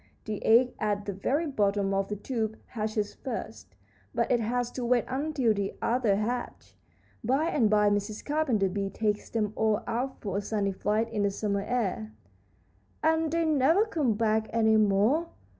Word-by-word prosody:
The 215 -2 -4
egg 245 +3 +5
at 205 -1 -1
the 200 - -3
very 275 - 0
bottom 200 -7 +1
of 195 0 0
the 210 - -3
tube 220 0 -3
hatches 215 -2 -3
first, 250 -4 -7 0.4
but - - +1
it 245 - +4
has 245 +2 -1
to 255 - -5
wait 240 0 +2
until 265 -3 0
the 200 -1 -3
others 230 -5 +1
hatch. 240 +4 -4 0.5
By 270 +8 +1
and 235 -10 +2
by 210 -1 +4
Mrs. 205 +1 -2
Carpenter 275 -10 +1
Bee 195 +1 -2
takes 210 0 -2
them 215 -2 -1
all 220 0 +1
out 255 +3 -3
for 200 -2 -3
a - - 0
sunny 205 -1 -1
flight 210 +4 0
in 215 -2 -1
the 200 - +2
summer 200 0 -1
air." 200 - -2 0.9
"And 320 0 +2
they 335 0 +1
never 315 +7 +3
come 295 - 0
back 220 0 +1
any 220 -1 +3
more!" 215 +10 +3
220 Hz, 175 wpm, -28 LUFS, 205-255 Hz, 0.9 s, egg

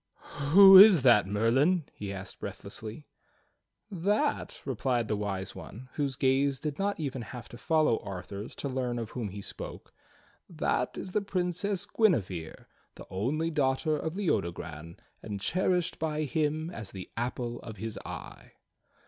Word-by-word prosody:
'Who 195 +4 +10
is 195 -8 +9
that. 120 -7 +6
Merlin?" 130 - +2
he 100 -1 -6
asked 95 -1 -7
breathlessly. 110 +6 -7 0.9
"That," 200 +3 0
replied 125 -3 0
the 105 - 0
Wise 100 -2 -3
One 125 +5 -10
whose 140 -3 -1
gaze 135 +1 +2
did 150 -2 -4
not 200 -1 -1
even 135 -4 -3
have 120 +1 -8
to 120 - -10
follow 155 -8 +2
Arthur's 100 +2 -7
to - - -4
learn 125 -2 -2
of 115 -2 -5
whom 115 -5 -4
he 100 +1 -7
spoke, - - -8 0.6
"That - - -1
is 185 - -5
the 210 - +1
Princess 190 +1 -1
Guinevere, 100 - 0 0.3
the - - -11
only 145 - -1
daughter 145 +1 +1
of 160 +3 -3
Leodogran 85 - -2 0.2
and 105 -2 -5
cherished 180 - 0
by 155 -1 -1
him 155 +2 -1
as 110 - -6
the 95 -1 -9
apple 120 0 -3
of 110 -2 -9
his 110 +2 -5
eye." - - -9
130 Hz, 150 wpm, -29 LUFS, 105-160 Hz, 0.9 s, Who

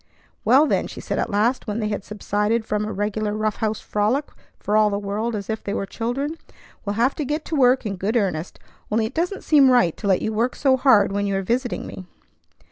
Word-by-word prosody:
"Well, 265 +7 +5
then," - - 0
she - - -9
said - - -3
at - - -1
last, 225 +6 +1
when 210 0 -2
they 215 -2 -1
had 205 -2 -3
subsided 210 +2 -1
from 210 -1 -1
a 215 - -4
regular 210 +1 -2
rough 215 -1 -1
house 220 -1 -1
frolic 220 +8 0 0.3
for 210 - -1
all 215 -1 +5
the 200 - -1
world 210 +3 -2
as 200 -2 -5
if 220 -1 -4
they 200 - -3
were - - -2
children, 265 +10 -3 0.5
"we'll 205 0 -2
have 240 +5 +2
to 305 - -1
get 300 +3 -3
to 320 - -3
work 255 -2 +4
in 200 -2 -3
good 210 +6 0
earnest; 180 -6 -2 0.3
only 220 +1 +1
it 225 - -5
doesn't 355 +6 -2
seem 285 -4 +5
right 240 -10 +4
to 205 - -4
let 190 -2 +2
you 220 - -1
work 235 +4 0
so 270 -2 +3
hard 235 -7 +4
when 200 0 -1
you 200 - -1
are 195 - -1
visiting 245 +5 -1
me." 185 - -9
215 Hz, 235 wpm, -22 LUFS, 205-250 Hz, 0.5 s, Well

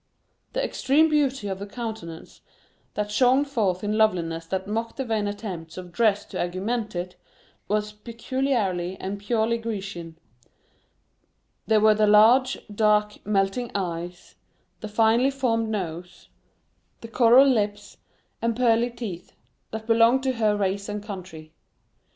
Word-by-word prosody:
The - - 0
extreme 305 - +2
beauty 275 -7 +1
of 190 -1 -4
the 200 - -6
countenance, 215 -7 -7 0.5
that 210 0 -2
shone 255 +5 +4
forth 210 -10 -1
in 210 +1 -1
loveliness 165 -6 +1
that 190 +2 -3
mocked 225 +2 -3
the 265 - -2
vain 220 -3 -1
attempts 185 -6 -6
of 180 -1 -8
dress 210 +1 +2
to - - -3
augment 205 +5 -3
it, 180 +1 -5 0.5
was 210 0 -1
peculiarly 210 -5 -2
and 200 +1 -4
purely 225 +2 0
Grecian; 195 -7 -6 1.5
there 220 -1 +4
were 215 0 +5
the 215 0 +2
large, 235 +6 +5 0.2
dark, 210 0 +1
melting 205 +4 0
eyes, 175 -1 -4 0.5
the 215 - -6
finely 225 +4 +3
formed 235 -5 0
nose, 180 -4 -5 0.7
the 230 - -8
coral 240 +3 +6
lips, 205 -5 -1 0.4
and 230 -1 0
pearly 235 0 +2
teeth, 215 -8 -7 0.4
that 220 0 -6
belonged 230 +3 +4
to 265 - +1
her 215 -3 +1
race 200 +1 -1
and 205 0 -4
country. 185 -6 -9
210 Hz, 135 wpm, -25 LUFS, 190-235 Hz, 1.5 s, coral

